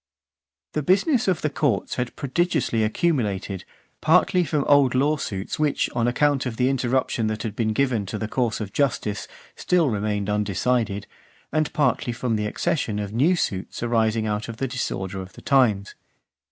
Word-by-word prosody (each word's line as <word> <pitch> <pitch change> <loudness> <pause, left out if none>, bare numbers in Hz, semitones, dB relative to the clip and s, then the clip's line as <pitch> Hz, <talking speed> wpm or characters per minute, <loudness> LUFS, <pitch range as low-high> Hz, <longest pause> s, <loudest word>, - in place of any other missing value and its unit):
X. 70 0 -67
The 150 - 0
business 205 - +2
of 185 -4 +1
the 155 - +2
courts 140 -9 0
had 125 -1 -3
prodigiously 140 -5 0
accumulated, 110 - -1 0.4
partly 180 +3 +4
from 150 -3 0
old 140 -3 +4
law 145 +4 +3
suits 100 -7 -4
which, 150 -2 +1
on 120 0 +1
account 140 +2 +2
of 115 -2 -5
the 125 +1 +2
interruption 130 -3 0
that 110 0 -3
had 110 -3 -4
been 110 -1 0
given 115 -4 0
to 110 - -4
the 110 - -3
course 120 0 -1
of 105 -3 -5
justice, 110 -7 -1 0.3
still 170 -7 +2
remained 105 -1 -1
undecided, 105 +1 0 0.5
and 155 0 0
partly 125 -4 +1
from 115 -1 -1
the 105 0 -1
accession 110 -1 -1
of 105 0 -4
new 150 +11 +3
suits 95 - -3
arising 110 -2 +1
out 105 +1 -2
of 115 - -6
the 135 - -1
disorder 95 -7 -3
of 95 0 -10
the - - -13
times. 110 -8 +2
120 Hz, 175 wpm, -24 LUFS, 105-140 Hz, 0.5 s, partly